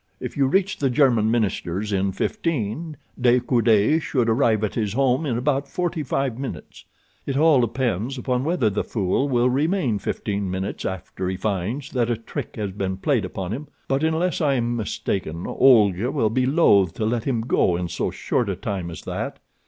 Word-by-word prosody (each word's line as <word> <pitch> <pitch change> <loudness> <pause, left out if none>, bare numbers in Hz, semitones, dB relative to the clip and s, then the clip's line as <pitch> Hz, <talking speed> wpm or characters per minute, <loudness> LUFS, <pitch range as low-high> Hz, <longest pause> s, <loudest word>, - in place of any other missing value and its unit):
If - - -6
you 140 -2 +2
reach 190 +6 +1
the 135 - +2
German 120 -4 +3
minister's 105 -3 -1
in 95 0 +1
fifteen, 150 - -2 0.2
De 125 0 +5
Coude 120 +3 +3
should 125 -6 0
arrive 110 -2 +2
at 105 - -1
his 105 -4 -1
home 135 +4 +1
in 120 -4 0
about 140 +2 0
forty 175 -2 -2
five 135 -3 -2
minutes. 135 - -7 0.4
It 135 -1 -1
all 150 -3 +5
depends 120 0 -1
upon 125 0 -1
whether 155 -9 +1
the 105 - -1
fool 105 +6 0
will 120 -1 +3
remain 140 - +1
fifteen 100 -2 -3
minutes 95 +2 -4
after 95 0 -4
he 95 - -3
finds 110 +7 -2
that 120 -2 0
a 120 - 0
trick 115 - -6
has 105 -3 -3
been 95 -1 -3
played - - +1
upon 95 -1 -5
him; 145 +5 -6 0.2
but 135 +2 0
unless 160 +3 0
I 140 -3 +2
am 120 -1 0
mistaken 95 -6 -3
Olga 110 -4 +4
will 125 -8 +1
be 130 +2 +1
loath 100 - +4
to 110 - -2
let 115 +1 -1
him 125 -5 0
go 110 -6 +2
in 90 0 -2
so - - -2
short 120 -5 -1
a 95 - -1
time 95 -2 -4
as 85 0 -8
that. - - -4
120 Hz, 190 wpm, -23 LUFS, 100-135 Hz, 0.4 s, De